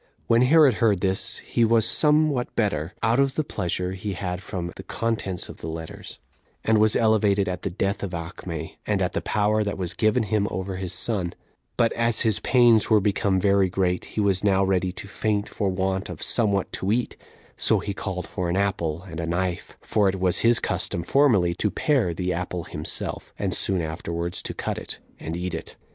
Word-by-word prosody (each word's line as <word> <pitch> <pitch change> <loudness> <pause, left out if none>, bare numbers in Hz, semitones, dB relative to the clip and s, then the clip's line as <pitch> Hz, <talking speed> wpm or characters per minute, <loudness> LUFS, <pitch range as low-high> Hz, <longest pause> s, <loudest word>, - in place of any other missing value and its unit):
When 115 +1 +4
Herod 145 +1 +6
heard 105 -5 +3
this, 95 -1 0
he 120 - +1
was 115 -1 +4
some 150 +2 +3
what 125 -3 -3
better, 90 -7 -1
out 115 +3 +3
of 135 -1 +2
the 155 - +1
pleasure 90 - -2
he 95 +2 -4
had 90 0 -4
from 85 -2 -5
the - - -8
contents 110 -6 -2
of - - -10
the - - -7
letters, 80 0 -7 0.5
and 110 -1 +3
was 110 0 +4
elevated 105 -3 +3
at 90 -1 -3
the - - -2
death 100 +2 -2
of 95 -3 -4
Acme, 85 -1 -6
and 105 -2 +1
at 90 - -1
the - - -1
power 105 +1 +1
that 100 -1 -3
was 90 -2 -2
given 110 +4 +2
him 105 0 0
over 95 0 -4
his 95 -2 -3
son; 95 -2 0 0.4
but 115 -1 +3
as 115 -1 +1
his 110 -3 +1
pains 120 -4 +4
were 110 -2 +6
become 100 -1 +1
very 100 -1 +3
great, 90 -1 0
he - - -6
was 100 -2 +1
now 95 -1 +3
ready 95 -1 +1
to 95 +2 -9
faint 105 +1 -1
for 100 -3 -1
want 95 +1 -1
of 90 - -5
somewhat 100 -5 0
to 95 - -1
eat; 120 +2 0 0.4
so - - +2
he 100 - -3
called 95 -3 -4
for 90 -1 -3
an 90 - 0
apple 85 -5 -1
and 85 -4 -8
a 85 - -3
knife; 90 +1 -2
for 105 -2 +2
it 95 0 -3
was 90 -2 +2
his 115 0 +4
custom 85 - -1
formerly 105 - +3
to 105 +4 -1
pare 130 - +1
the 90 +2 -2
apple 90 0 -3
himself, 75 -1 -4
and - - -1
soon 95 -3 0
afterwards 85 +2 -3
to - - -3
cut - - -3
it, - - -7 0.2
and 80 +2 -4
eat 90 0 -3
it. - - -6
95 Hz, 205 wpm, -24 LUFS, 90-110 Hz, 0.5 s, Herod